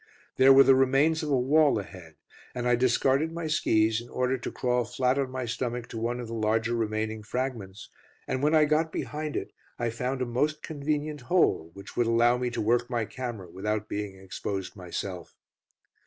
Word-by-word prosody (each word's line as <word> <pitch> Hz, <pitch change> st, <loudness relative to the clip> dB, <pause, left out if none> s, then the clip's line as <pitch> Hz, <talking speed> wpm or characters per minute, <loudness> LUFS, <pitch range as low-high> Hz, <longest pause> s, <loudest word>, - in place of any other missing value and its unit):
There 135 Hz, +1 st, +7 dB
were 135 Hz, 0 st, +9 dB
the 135 Hz, 0 st, +6 dB
remains 135 Hz, +5 st, +3 dB
of 155 Hz, -, -3 dB
a 135 Hz, -3 st, +3 dB
wall 145 Hz, +2 st, +4 dB
ahead, 90 Hz, -5 st, -9 dB, 0.4 s
and 125 Hz, 0 st, -2 dB
I 125 Hz, -, +4 dB
discarded 130 Hz, +5 st, +2 dB
my 170 Hz, 0 st, -5 dB
skis 110 Hz, -7 st, +2 dB
in 120 Hz, -, -13 dB
order 125 Hz, +1 st, 0 dB
to 125 Hz, -, -5 dB
crawl 125 Hz, -1 st, 0 dB
flat 125 Hz, +3 st, 0 dB
on 135 Hz, -2 st, -1 dB
my 130 Hz, -1 st, -4 dB
stomach 120 Hz, 0 st, -3 dB
to 115 Hz, -, -5 dB
one 120 Hz, +2 st, -2 dB
of 120 Hz, -, -5 dB
the 115 Hz, -, -7 dB
larger 110 Hz, +1 st, 0 dB
remaining 110 Hz, -1 st, -2 dB
fragments, 110 Hz, -3 st, -4 dB, 0.4 s
and 130 Hz, -, -2 dB
when 150 Hz, +2 st, +3 dB
I 155 Hz, -1 st, +6 dB
got 155 Hz, +2 st, +1 dB
behind 150 Hz, 0 st, -4 dB
it -, -, -3 dB, 0.3 s
I 120 Hz, -1 st, -1 dB
found 125 Hz, +2 st, -2 dB
a -, -, -1 dB
most 145 Hz, +6 st, -1 dB
convenient 150 Hz, -1 st, -3 dB
hole, 125 Hz, -, +2 dB
which 100 Hz, -, -11 dB
would 120 Hz, -1 st, +2 dB
allow 120 Hz, +1 st, +4 dB
me 125 Hz, 0 st, -1 dB
to 120 Hz, -, -3 dB
work 120 Hz, +3 st, +1 dB
my 120 Hz, -3 st, -1 dB
camera 120 Hz, -6 st, -6 dB
without 105 Hz, +3 st, -2 dB
being 105 Hz, -2 st, -4 dB
exposed 95 Hz, +1 st, -5 dB
myself. 90 Hz, -1 st, -6 dB
120 Hz, 195 wpm, -27 LUFS, 110-135 Hz, 0.4 s, were